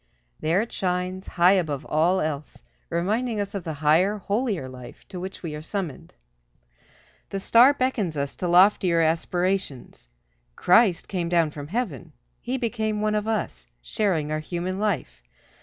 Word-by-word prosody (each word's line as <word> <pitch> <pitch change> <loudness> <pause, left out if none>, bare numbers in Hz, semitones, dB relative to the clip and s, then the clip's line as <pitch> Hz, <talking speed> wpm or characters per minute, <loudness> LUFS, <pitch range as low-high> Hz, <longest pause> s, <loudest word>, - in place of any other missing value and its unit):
There 170 +7 +1
it 235 - -10
shines, 185 0 -2
high 175 +1 +4
above 160 -8 0
all 170 +5 +2
else, 150 -1 -4 0.3
reminding 215 +7 -1
us 200 0 -3
of 200 -3 -4
the 160 - -4
higher, 180 +8 +4
holier 205 - -2
life 125 -1 -12
to 185 -2 -7
which 190 +1 -7
we 160 -3 -4
are 150 - -6
summoned. 170 -2 -5 1.1
The 195 - -3
star 240 +8 +6
beckons 225 - -1
us 140 0 -2
to 180 - -2
loftier 180 -1 +4
aspirations. 170 - -1 0.5
Christ 185 -1 +4
came 175 -3 -2
down 170 -3 +2
from 145 -1 -8
heaven. 175 - -4 0.3
He 255 +2 -2
became 220 -3 -2
one 215 0 0
of 210 0 -1
us, - - -3
sharing 160 - -1
our 155 - -1
human 175 +4 -4
life. 185 - -2
180 Hz, 155 wpm, -25 LUFS, 155-210 Hz, 1.1 s, star